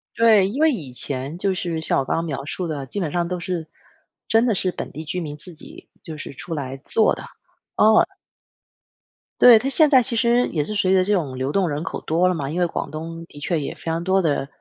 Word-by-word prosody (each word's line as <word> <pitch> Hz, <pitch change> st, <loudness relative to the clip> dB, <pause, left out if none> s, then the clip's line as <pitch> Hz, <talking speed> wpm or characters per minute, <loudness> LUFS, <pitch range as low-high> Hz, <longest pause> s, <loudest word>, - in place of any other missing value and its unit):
对， 220 Hz, -4 st, +5 dB
因 260 Hz, +10 st, -3 dB
为 320 Hz, -, +5 dB
以 150 Hz, -, -6 dB
前 135 Hz, +5 st, -4 dB
就 195 Hz, +1 st, 0 dB
是 170 Hz, -3 st, -3 dB
像 160 Hz, -, +1 dB
我 135 Hz, -, -1 dB
刚 -, -, -1 dB
刚 165 Hz, -, -1 dB
描 140 Hz, -4 st, -4 dB
述 180 Hz, +5 st, -4 dB
的， 145 Hz, -4 st, -4 dB
基 200 Hz, +10 st, -5 dB
本 160 Hz, -5 st, -2 dB
上 175 Hz, -1 st, 0 dB
都 180 Hz, +1 st, -3 dB
是 175 Hz, -2 st, -4 dB, 0.6 s
真 225 Hz, +2 st, +4 dB
的 225 Hz, -5 st, +2 dB
是 185 Hz, 0 st, 0 dB
本 -, -, -6 dB
地 155 Hz, -, -6 dB
居 170 Hz, +4 st, -4 dB
民 150 Hz, -4 st, -5 dB
自 175 Hz, +4 st, -12 dB
己 155 Hz, -, -14 dB
就 160 Hz, -3 st, -7 dB
是 145 Hz, -, -8 dB
出 165 Hz, +5 st, -7 dB
来 135 Hz, -2 st, -5 dB
做 215 Hz, +10 st, +2 dB
的。 -, -, -7 dB, 0.5 s
哦。 220 Hz, +1 st, +5 dB, 1.3 s
对， 240 Hz, -3 st, +9 dB
它 260 Hz, -, -3 dB
现 300 Hz, +2 st, +4 dB
在 265 Hz, -3 st, +6 dB
其 245 Hz, 0 st, -1 dB
实 240 Hz, +1 st, +3 dB
也 155 Hz, -3 st, -1 dB
是 185 Hz, -, -3 dB
随 190 Hz, -2 st, +2 dB
着 185 Hz, -, +4 dB
这 205 Hz, -, -1 dB
种 145 Hz, -10 st, -1 dB
流 130 Hz, +2 st, -2 dB
动 190 Hz, +2 st, +1 dB
人 145 Hz, +1 st, -3 dB
口 -, -, -4 dB
多 175 Hz, +3 st, +2 dB
了 -, -, +1 dB
嘛， 145 Hz, -5 st, -3 dB
因 165 Hz, -, -4 dB
为 -, -, +4 dB
广 165 Hz, -, -4 dB
东 165 Hz, +2 st, -7 dB
的 145 Hz, -, -17 dB
确 165 Hz, +2 st, -1 dB
也 140 Hz, -, -5 dB
非 -, -, -17 dB
常 165 Hz, 0 st, -2 dB
多 190 Hz, +2 st, +2 dB
的 145 Hz, -5 st, 0 dB
170 Hz, 265 characters per minute, -22 LUFS, 150-200 Hz, 1.3 s, 对